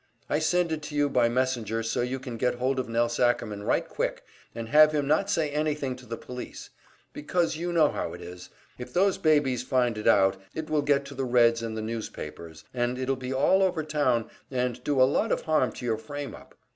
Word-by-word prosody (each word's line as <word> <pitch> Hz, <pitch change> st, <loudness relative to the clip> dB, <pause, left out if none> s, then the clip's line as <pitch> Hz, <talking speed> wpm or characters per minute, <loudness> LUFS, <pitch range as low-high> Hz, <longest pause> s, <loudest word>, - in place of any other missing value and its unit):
I 150 Hz, -, +2 dB
send 175 Hz, +1 st, +1 dB
it 155 Hz, -1 st, -2 dB
to 150 Hz, 0 st, -7 dB
you 145 Hz, 0 st, +2 dB
by 120 Hz, -3 st, +3 dB
messenger 120 Hz, -3 st, -1 dB
so 115 Hz, +1 st, -1 dB
you 125 Hz, +2 st, -2 dB
can 125 Hz, -2 st, -7 dB
get 125 Hz, +2 st, 0 dB
hold 130 Hz, +2 st, 0 dB
of 130 Hz, -, -3 dB
Nelse 120 Hz, +1 st, 0 dB
Ackerman 110 Hz, -4 st, +1 dB
right -, -, 0 dB
quick, -, -, -3 dB, 0.3 s
and 115 Hz, -1 st, -5 dB
have 155 Hz, +2 st, +7 dB
him 145 Hz, -2 st, 0 dB
not 160 Hz, +7 st, +2 dB
say 160 Hz, -7 st, +1 dB
anything 150 Hz, -3 st, -1 dB
to 125 Hz, -1 st, -14 dB
the 115 Hz, 0 st, -5 dB
police; 125 Hz, 0 st, -8 dB, 0.4 s
because 170 Hz, +2 st, 0 dB
you 175 Hz, +2 st, -3 dB
know 160 Hz, -3 st, +4 dB
how -, -, -4 dB
it -, -, -8 dB
is 90 Hz, 0 st, -10 dB, 0.3 s
if 125 Hz, -, -7 dB
those 190 Hz, +1 st, +2 dB
babies 145 Hz, -6 st, +2 dB
find 125 Hz, -3 st, 0 dB
it 105 Hz, -, -3 dB
out, 95 Hz, -1 st, +4 dB
it 155 Hz, -1 st, -5 dB
will 150 Hz, -1 st, +3 dB
get 140 Hz, -1 st, +2 dB
to 140 Hz, -, -9 dB
the 135 Hz, 0 st, -3 dB
Reds 120 Hz, -2 st, +4 dB
and 115 Hz, -1 st, -4 dB
the 110 Hz, -, -3 dB
newspapers, 85 Hz, -8 st, -7 dB
and 120 Hz, 0 st, -1 dB
it'll 130 Hz, +1 st, 0 dB
be 130 Hz, 0 st, -6 dB
all 140 Hz, +9 st, +3 dB
over 180 Hz, -4 st, +1 dB
town 145 Hz, -7 st, +1 dB, 0.2 s
and 125 Hz, -1 st, -2 dB
do 145 Hz, -1 st, 0 dB
a -, -, +8 dB
lot 145 Hz, +12 st, +2 dB
of -, -, +1 dB
harm 155 Hz, -7 st, +1 dB
to 125 Hz, -, -7 dB
your 115 Hz, -2 st, 0 dB
frame 145 Hz, +3 st, -6 dB
up. -, -, -14 dB
130 Hz, 225 wpm, -27 LUFS, 115-150 Hz, 0.4 s, a